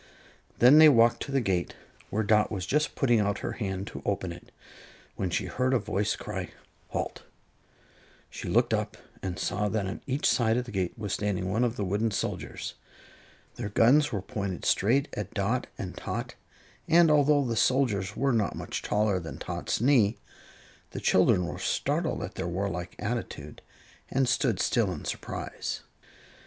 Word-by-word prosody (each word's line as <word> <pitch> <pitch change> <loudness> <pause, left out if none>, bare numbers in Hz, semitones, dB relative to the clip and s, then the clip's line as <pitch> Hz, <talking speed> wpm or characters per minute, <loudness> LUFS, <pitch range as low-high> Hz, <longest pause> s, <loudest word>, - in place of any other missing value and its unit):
Then 130 +6 +8
they 155 -1 +10
walked 115 -3 +4
to 140 - -4
the 135 - +2
gate, 95 -5 -1 0.3
where 110 +2 0
Dot 105 0 +3
was 95 -4 -3
just 150 +8 0
putting 120 -5 +3
out 100 -1 +1
her - - -2
hand 95 -3 -3
to - - -8
open 95 -3 -2
it, 85 - -12 0.6
when 95 - -2
she 95 +3 -1
heard 130 +7 0
a - - +5
voice 105 -1 -1
cry: - - -5 0.4
"Halt!" - - -4 1.1
She - - -6
looked - - +3
up - - -1 0.2
and 90 -2 -4
saw 105 +3 -1
that 105 -1 -1
on 95 +3 -5
each 135 +2 -1
side 115 -2 +3
of 125 - -1
the 120 - -9
gate 95 -1 -2
was 105 -3 -3
standing 95 -3 -1
one 110 +5 +1
of 120 -1 0
the 100 - -2
wooden 105 +4 0
soldiers. 105 - -4 0.8
Their 105 - -3
guns 135 +8 +4
were 100 -5 -3
pointed 100 -6 -4
straight 135 +9 +3
at 105 +2 -5
Dot 110 +5 0
and 95 - -6
Tot, - - -4 0.5
and 165 -1 +6
although 145 -1 +4
the 115 -2 -1
soldiers 110 -6 +1
were 135 +1 +2
not 110 -3 0
much - - -4
taller 105 -2 +1
than 80 -2 -7
Tot's - - -3
knee, 120 -4 +4 0.8
the - - -4
children 95 -1 +3
were - - -5
startled - - -1
at - - -6
their - - -4
warlike 90 -1 -3
attitude 105 -10 -5 0.5
and 135 -1 +1
stood 120 -5 +1
still 110 -6 +2
in 85 - -6
surprise. - - -4
105 Hz, 170 wpm, -28 LUFS, 95-125 Hz, 1.1 s, they